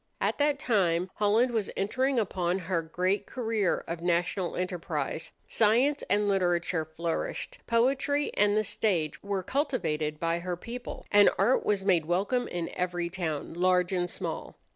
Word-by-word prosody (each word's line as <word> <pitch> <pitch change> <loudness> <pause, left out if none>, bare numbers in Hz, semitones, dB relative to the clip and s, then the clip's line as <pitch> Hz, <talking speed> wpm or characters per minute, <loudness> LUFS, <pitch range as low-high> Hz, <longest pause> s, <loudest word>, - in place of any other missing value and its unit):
At - - 0
that 290 0 +3
time 185 -8 +1
Holland 220 +4 +3
was 220 -4 -1
entering 260 +7 0
upon 185 -4 0
her 180 -2 -1
great 185 +5 -1
career 225 -6 0
of 170 0 -4
national 175 +1 0
enterprise. 170 -4 -3 0.2
Science 245 +7 +3
and 205 0 +2
literature 175 -3 +1
flourished, 165 - -4
poetry 270 +5 +2
and 205 0 +3
the 215 - +3
stage 195 -7 0
were 200 -2 -2
cultivated 160 - -1
by 165 0 0
her 175 0 -3
people, 240 +6 -7
and 205 0 +7
art 215 +7 +3
was 200 -2 +1
made 175 -5 +3
welcome 200 +9 0
in 170 -1 -3
every 175 -1 -2
town, 165 -6 -3
large 180 +1 +2
and 180 -1 0
small. - - -5
190 Hz, 150 wpm, -29 LUFS, 175-220 Hz, 0.2 s, and